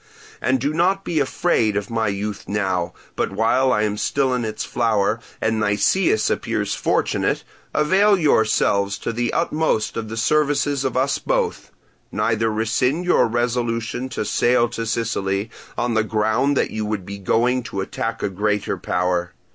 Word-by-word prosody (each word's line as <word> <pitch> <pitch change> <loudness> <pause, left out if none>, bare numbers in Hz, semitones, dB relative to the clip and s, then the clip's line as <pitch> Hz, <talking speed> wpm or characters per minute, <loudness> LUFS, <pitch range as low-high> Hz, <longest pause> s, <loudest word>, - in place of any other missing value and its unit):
And 130 +2 +2
do 145 +5 -1
not 190 +4 +1
be 165 -3 0
afraid 130 -7 +1
of 105 +3 -4
my 115 -1 0
youth 100 +1 -3
now, 95 -4 -1 0.2
but - - -1
while 115 +6 +2
I 105 -3 +2
am 105 -1 -1
still 135 +3 +1
in 125 -1 -1
its 110 -1 -3
flower, 110 -2 +1 0.2
and 110 0 0
Nicias 110 - +2
appears - - -1
fortunate, - - 0 0.3
avail 195 +7 +4
yourselves 105 - +2
to 115 - -4
the 120 +1 -1
utmost 155 -11 0
of 110 -1 -4
the 115 - -5
services 145 +2 +1
of 130 -1 -1
us 135 +2 +1
both. - - -1 0.4
Neither 110 0 +1
rescind 125 +9 0
your 180 - +4
resolution 120 +1 -1
to 110 - -3
sail 120 +2 +2
to 115 -1 -4
Sicily, 105 -2 -1 0.3
on 120 0 0
the 110 -1 +2
ground 110 +6 +1
that - - +1
you 110 - -3
would 105 -3 -3
be 100 +1 -7
going 120 +6 +1
to 100 -5 -4
attack 95 - -4
a - - +1
great 105 +2 -1 0.2
power. 90 0 -1
115 Hz, 165 wpm, -21 LUFS, 105-130 Hz, 0.4 s, avail